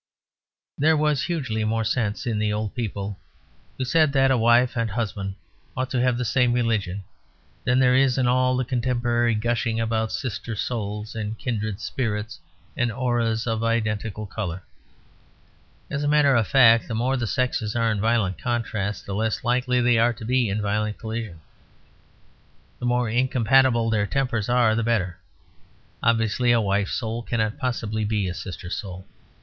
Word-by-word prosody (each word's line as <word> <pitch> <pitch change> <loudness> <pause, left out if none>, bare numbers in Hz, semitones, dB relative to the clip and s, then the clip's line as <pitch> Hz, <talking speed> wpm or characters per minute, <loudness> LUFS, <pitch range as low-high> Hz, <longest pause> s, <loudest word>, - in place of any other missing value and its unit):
There 155 +2 +4
was 150 -2 +1
hugely 135 -11 -2
more 110 +1 0
sense 110 +2 -1
in 115 -3 -1
the 105 0 0
old 105 0 -2
people 100 -5 -4 0.6
who 130 - -2
said 155 +1 +3
that 135 -1 +4
a - - +4
wife 120 +1 +4
and 115 -2 0
husband 100 -3 -3 0.4
ought 130 0 -2
to 125 - +1
have 125 -1 +2
the 125 - -2
same 120 +2 +2
religion 105 -6 -1 0.6
than 125 - +3
there 125 -1 +4
is 130 -1 +3
in 130 - +2
all 130 +1 +2
the 130 - 0
contemporary 120 -2 0
gushing 115 +1 -1
about 110 -1 -1
sister 115 -1 -4
souls 105 -1 -4
and 110 0 -4
kindred 110 -5 -3
spirits 110 -3 -3 0.4
and 120 -1 0
auras 115 -2 0
of 115 -1 -1
identical 110 -2 -1
colour. 95 -3 -5 1.3
As 150 -1 -2
a - - 0
matter 145 -2 +4
of 115 -3 +2
fact, 115 -4 +5
the 115 - -3
more 125 +4 +1
the 120 -3 -2
sexes 120 -3 -1
are 115 -1 +2
in 105 -2 -1
violent 110 -5 +1
contrast 110 -4 -2
the 100 - -5
less 110 +2 -1
likely 125 +1 +1
they 120 -1 +3
are 120 +1 +3
to 110 - -9
be 125 -1 +1
in 105 +2 -2
violent 105 +1 -1
collision. 110 -7 -6 1.4
The 120 - -2
more 125 0 +1
incompatible 120 0 +3
their 105 -2 +1
tempers 125 -4 -1
are 120 -3 +4
the 115 - 0
better. 110 -6 -1 0.8
Obviously 115 +1 +2
a 120 - +4
wife's 100 -2 0
soul 115 -1 -3
cannot 110 -2 -2
possibly 110 -4 -2
be 105 -2 0
a 90 - -3
sister 90 0 -7
soul. 95 -3 -5
115 Hz, 165 wpm, -24 LUFS, 105-125 Hz, 1.4 s, fact